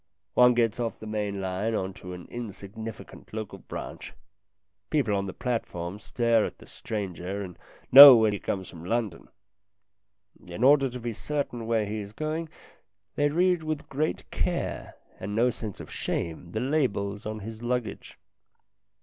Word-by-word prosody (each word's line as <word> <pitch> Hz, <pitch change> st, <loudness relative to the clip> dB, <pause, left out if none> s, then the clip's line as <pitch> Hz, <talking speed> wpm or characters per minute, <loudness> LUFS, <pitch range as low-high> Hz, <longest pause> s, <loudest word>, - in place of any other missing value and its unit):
One 125 Hz, +2 st, +6 dB
gets 115 Hz, -1 st, +1 dB
off 115 Hz, -2 st, -2 dB
the -, -, -9 dB
main 105 Hz, -2 st, -2 dB
line 95 Hz, +4 st, -1 dB
on 95 Hz, -2 st, -2 dB
to 90 Hz, 0 st, -7 dB
an 90 Hz, -1 st, -9 dB
insignificant 110 Hz, -1 st, -8 dB
local 110 Hz, -2 st, -5 dB
branch. -, -, -8 dB, 0.8 s
People 130 Hz, -10 st, +1 dB
on 100 Hz, 0 st, -1 dB
the -, -, -4 dB
platform 100 Hz, -6 st, -3 dB
stare 115 Hz, -1 st, +2 dB
at -, -, -4 dB
the -, -, -15 dB
stranger 100 Hz, -2 st, -5 dB
and 90 Hz, -3 st, -8 dB, 0.4 s
know 140 Hz, 0 st, +13 dB
when 110 Hz, -2 st, +3 dB
he 100 Hz, -, -3 dB
comes 95 Hz, -2 st, -3 dB
from 85 Hz, -1 st, -11 dB
London. 105 Hz, -2 st, -2 dB, 1.2 s
In 90 Hz, +5 st, -5 dB
order 135 Hz, 0 st, +6 dB
to 125 Hz, +1 st, -7 dB
be 120 Hz, -1 st, -4 dB
certain 125 Hz, -2 st, -3 dB
where 115 Hz, -2 st, +1 dB
he 105 Hz, +1 st, -4 dB
is 100 Hz, 0 st, -8 dB
going, 155 Hz, +5 st, -3 dB, 0.6 s
they 145 Hz, 0 st, +2 dB
read 175 Hz, +2 st, +2 dB
with 155 Hz, -1 st, -4 dB
great 150 Hz, +3 st, -2 dB
care -, -, -2 dB, 0.2 s
and 100 Hz, +2 st, -4 dB
no 120 Hz, +3 st, +3 dB
sense 110 Hz, -4 st, -7 dB
of -, -, -9 dB
shame 85 Hz, +1 st, -3 dB
the 110 Hz, -, -1 dB
labels 115 Hz, -7 st, -1 dB
on 110 Hz, 0 st, -5 dB
his 110 Hz, +2 st, -8 dB
luggage. 120 Hz, -3 st, -3 dB
110 Hz, 160 wpm, -27 LUFS, 100-125 Hz, 1.2 s, know